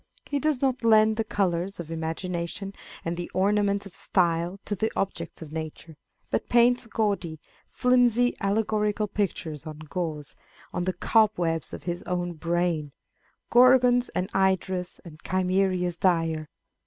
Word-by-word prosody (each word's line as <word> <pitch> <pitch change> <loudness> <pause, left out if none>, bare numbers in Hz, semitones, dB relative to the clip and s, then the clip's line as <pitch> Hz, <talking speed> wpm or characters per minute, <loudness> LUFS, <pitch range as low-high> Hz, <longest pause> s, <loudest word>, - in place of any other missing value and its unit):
He 285 - -1
does 290 -2 0
not 260 -3 +1
lend 220 -1 +5
the 225 - +1
colours 190 -3 -1
of 165 -1 -6
imagination 170 +4 -4 0.3
and 170 +1 -1
the 175 0 -5
ornaments 200 +1 +2
of 195 -1 -12
style 175 0 0
to 205 - -2
the 220 +3 -1
objects 170 -4 -3
of 150 - -11
nature, 160 0 -7 0.4
but - - -1
paints 240 0 +4
gaudy, 200 -8 -1 0.3
flimsy, 245 -1 +3
allegorical 210 +1 0
pictures 185 -7 -3
on 155 -1 -7
gauze, 155 -1 -5 0.4
on 175 - -1
the 185 - 0
cobwebs 175 - +2
of - - -8
his 175 0 -3
own 175 -1 -1
brain, 165 -2 -1 0.3
" - - -40
Gorgons 250 0 +6
and 180 - 0
Hydras, 190 -1 0
and 155 -2 -12
Chimeras 185 -1 0
dire." 165 -4 +1
185 Hz, 140 wpm, -26 LUFS, 170-215 Hz, 0.4 s, Gorgons